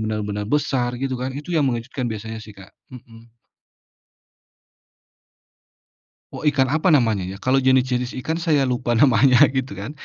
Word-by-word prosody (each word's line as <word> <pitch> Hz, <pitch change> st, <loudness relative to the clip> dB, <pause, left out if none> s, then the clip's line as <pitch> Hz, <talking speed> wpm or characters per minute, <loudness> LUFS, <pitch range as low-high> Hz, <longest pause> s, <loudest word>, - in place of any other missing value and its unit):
benar-benar 105 Hz, -1 st, -3 dB
besar, 125 Hz, -3 st, 0 dB
gitu, 130 Hz, 0 st, -3 dB
kan. 130 Hz, +1 st, -4 dB
Itu 150 Hz, +5 st, -7 dB
yang 150 Hz, -5 st, +2 dB
mengejutkan, 125 Hz, +1 st, -3 dB
biasanya, 110 Hz, 0 st, -6 dB
sih, 105 Hz, -1 st, -13 dB
Kak. 95 Hz, -1 st, -15 dB, 0.2 s
Mhm. 115 Hz, -2 st, -15 dB, 3.0 s
Oh, -, -, -6 dB
ikan 135 Hz, -3 st, +2 dB
apa, 160 Hz, +3 st, +2 dB
namanya, 110 Hz, -9 st, +1 dB
ya? 95 Hz, +1 st, -7 dB
Kalau 130 Hz, +1 st, +2 dB
jenis-jenis 130 Hz, -1 st, +1 dB
ikan, 160 Hz, +4 st, -2 dB
saya 160 Hz, -4 st, +1 dB
lupa 125 Hz, -2 st, -1 dB
namanya, 130 Hz, +1 st, +4 dB
gitu, 130 Hz, -5 st, -3 dB
kan. 100 Hz, +5 st, -7 dB
125 Hz, 145 wpm, -21 LUFS, 110-135 Hz, 3.0 s, namanya